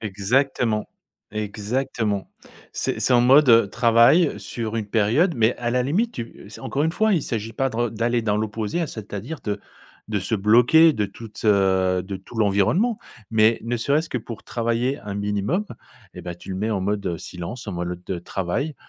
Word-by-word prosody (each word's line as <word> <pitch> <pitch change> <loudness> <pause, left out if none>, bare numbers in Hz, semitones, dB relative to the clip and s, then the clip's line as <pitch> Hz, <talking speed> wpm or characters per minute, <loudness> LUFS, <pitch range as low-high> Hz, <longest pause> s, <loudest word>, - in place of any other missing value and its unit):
Exactement, 110 +2 0 0.4
exactement. 105 0 -2 0.4
C'est - - -2
c'est 130 - +2
en 120 - +6
mode, 135 +3 +6
heu, 115 -3 +6
travail 120 - +4
sur 115 -1 -4
une 110 -2 -2
période 120 - +2
mais 115 +1 +2
à 120 -1 -2
la 125 +1 +1
limite 200 - 0
tu 115 -3 -8
c'est - - -11
encore 140 - -2
une 160 - +1
fois 220 +2 +2
il 160 - +1
s'agit 115 -1 -3
pas 135 +3 -1
de - - -7
re 120 -1 0
d'aller 115 +2 0
dans 105 -1 +1
l'opposé, 110 +9 -2
c'est 110 -6 -9
à 100 - -3
dire 150 +8 -7
de 105 -1 -3 0.5
de 105 - 0
se 100 +4 -2
bloquer 120 +11 +5
de 105 -6 -1
toute, 105 +2 -11
heu, 95 -2 +3
de 95 +2 -5
tout 95 +5 -13
l'environnement 110 - +2 0.3
mais 110 0 +4
ne 120 +1 -2
serait 140 +6 +1
ce 165 - -10
que 125 - -1
pour 115 -1 -9
travailler 120 +3 -1
un 105 -2 -6
minimum 105 - -1 0.5
et 90 - -9
bah, 90 0 -6
tu 90 - -11
le 95 - -3
mets 105 +4 -1
en 100 - -1
mode, 100 0 -2
heu, 85 -2 -1
silence 90 +8 -7
en 105 - -4
mode 85 0 -3
le 90 - -4 0.2
de - - -4
travail 95 - -3
115 Hz, 205 wpm, -23 LUFS, 100-125 Hz, 0.5 s, en